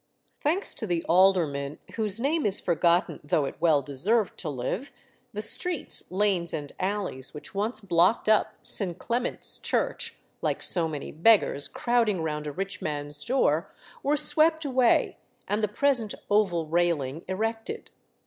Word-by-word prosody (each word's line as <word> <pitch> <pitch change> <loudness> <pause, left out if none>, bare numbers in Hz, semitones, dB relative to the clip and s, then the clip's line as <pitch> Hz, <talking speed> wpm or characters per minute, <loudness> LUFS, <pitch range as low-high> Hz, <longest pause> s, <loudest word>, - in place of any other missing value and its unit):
Thanks 340 +7 0
to 220 - -5
the 175 -2 0
alderman, 165 -6 +2 0.2
whose 215 -1 -1
name 295 +5 0
is 200 - +4
forgotten, 170 -1 +1
though 145 0 +1
it - - -4
well 155 -4 +3
deserved 190 - 0
to 160 - -3
live, 145 - -4 0.4
the 210 +1 -4
streets, 350 - +1
lanes, 185 -3 +1
and 145 -2 -6
alleys 190 -9 -3
which 150 - -10
once 215 +4 -2
blocked 185 +3 +2
up 215 -1 +3
St. 180 -4 +1
Clement's 240 +1 -2
Church, - - -2 0.2
like - - -1
so 170 -3 +3
many 150 -3 -6
beggars 165 -4 +3
crowding 230 -7 0
round 150 -1 -3
a - - -3
rich 195 +5 -5
man's 145 -1 -2
door, 200 - +1 0.3
were 290 +2 +1
swept 315 +1 +3
away, 255 -3 +2 0.3
and 210 +1 -1
the - - +3
present 235 -1 0 0.2
oval 190 -6 +2
railing 160 -3 0
erected. 225 +4 -4
190 Hz, 150 wpm, -27 LUFS, 160-225 Hz, 0.4 s, is